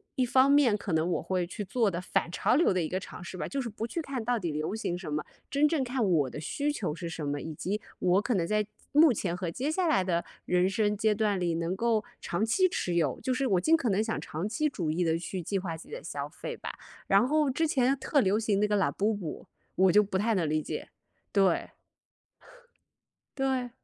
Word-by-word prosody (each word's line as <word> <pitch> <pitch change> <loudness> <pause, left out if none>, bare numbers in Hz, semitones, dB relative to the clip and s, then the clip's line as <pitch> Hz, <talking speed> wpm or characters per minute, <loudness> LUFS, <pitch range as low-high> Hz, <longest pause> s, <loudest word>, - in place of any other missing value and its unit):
一 255 - +2
方 260 +3 +4
面 280 -7 +5
可 200 - -5
能 160 +1 +1
我 - - 0
会 180 -2 -1
去 205 +4 -5
做 215 +2 +1
的 170 -1 -3
反 180 - -1
潮 175 - +1
流 305 - +4
的 185 - +1
一 155 - -2
个 185 - -1
尝 180 - -9
试 185 +1 -7
吧， - - -3
就 275 - -2
是 240 - -4
不 220 +1 -4
去 335 - -3
看 270 -6 -4
到 245 +1 +1
底 175 -7 -2
流 155 +7 -2
行 175 -5 -2
什 170 -5 -6
么， 150 - -1 0.3
真 285 +1 +3
正 300 -2 +2
看 250 -1 -1
我 160 -8 +2
的 150 - -7
需 290 - -1
求 190 - -2
是 170 +2 -6
什 160 -2 -5
么， 145 0 -2
以 160 +2 -6
及 195 +7 -3 0.2
我 185 +2 +3
可 245 - -1
能 175 -5 +1
在 210 +2 0 0.3
目 300 -1 +7
前 180 -5 -2
和 180 -3 -3
接 265 - -2
下 350 +2 +1
来 195 -11 +3
的 170 -2 0 0.2
人 180 +1 +3
生 210 +1 +1
阶 215 0 +3
段 210 -2 +1
里 175 -2 0
能 170 +2 -1
够 225 +1 +1 0.2
长 175 +5 -2
期 370 - +3
持 180 - -2
有， 155 -6 +1
就 260 - -1
是 260 +2 0
我 190 -7 +2
尽 325 - +4
可 265 -7 -1
能 200 +3 +2
想 225 0 -2
长 165 +7 -4
期 305 +7 0
主 175 - -3
义 165 +3 0
地 165 -1 +1
去 185 +2 -5
计 195 +4 -1
划 170 -3 -4
自 160 - -13
己 - - -11
的 - - -6
消 - - -4
费 - - -7
吧。 - - -5 0.3
然 245 - +4
后 305 +1 +2
之 320 +5 +1
前 270 -2 +2
特 280 +1 +2
流 200 0 +2
行 210 -3 +1
那 210 - +3
个 210 - +1
Labubu， 200 -2 -1 0.3
我 190 0 +5
就 210 - +6
不 195 -2 -2
太 220 +4 +1
能 170 -7 +1
理 155 0 0
解， - - -5 0.4
对。 195 -4 +2 1.7
对。 260 -2 0
205 Hz, 275 characters per minute, -29 LUFS, 175-250 Hz, 1.7 s, 目